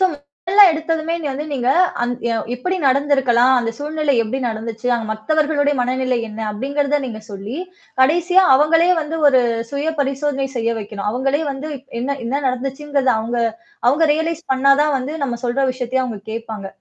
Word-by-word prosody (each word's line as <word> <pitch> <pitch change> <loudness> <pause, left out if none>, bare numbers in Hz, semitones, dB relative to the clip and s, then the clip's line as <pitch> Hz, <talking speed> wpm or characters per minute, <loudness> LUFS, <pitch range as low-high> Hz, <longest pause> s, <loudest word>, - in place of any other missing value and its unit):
சொல்லுங் 335 -7 0 0.3
மொதல்ல 405 +2 +8
எடுத்ததுமே 320 0 -2
இங்க 300 -3 -4
வந்து 290 +3 -4
நீங்க, 255 -2 -1 0.3
அந் 240 0 0 0.2
அ - - +1 0.2
"எப்பிடி 365 +10 -2
நடந்திருக்கலாம்? 265 -2 +3
அந்த 230 -1 -2
சூழ்நிலை 300 -1 -1
எப்டி 225 +5 -3
நடந்துச்சு? 225 +1 -5
அங்க 230 -2 -3
மத்தவர்களுடைய 290 +5 +1
மனநிலை 255 0 0
என்ன?" 215 +1 -8
அப்பிடிங்கிறத 280 +7 -1
நீங்க 225 -4 -6
சொல்லி, 200 +3 -7 0.5
கடைசியா 350 +7 +4
அவுங்களயே 325 +5 +4
வந்து, 315 +1 -4
ஒரு 265 -3 +5 0.3
சுயபரிசோதனை 280 -1 -1
செய்ய 230 0 0
வைக்கணும். 210 -1 -6
அவுங்களே 270 +5 0
வந்து 275 +3 -5 0.3
என்னா? 275 +3 -1
என்னா 270 +5 -1
நடந்துச்சுங்கிறத? 270 +1 -1
அவுங்க 235 +2 -3 0.5
அவுங்க 295 +6 +3
ரியலைஸ் 320 +1 -2
பண்ணா 270 +1 +4
தான் 300 -1 +1
வந்து 265 +4 -5
நம்ம 245 -4 -2
சொல்ற 250 +3 +1
விஷயத்தையே 255 +1 -1
அவுங்க 225 -5 -5
கேட்பாங்க 220 -3 -6
270 Hz, 155 wpm, -19 LUFS, 240-300 Hz, 0.5 s, மொதல்ல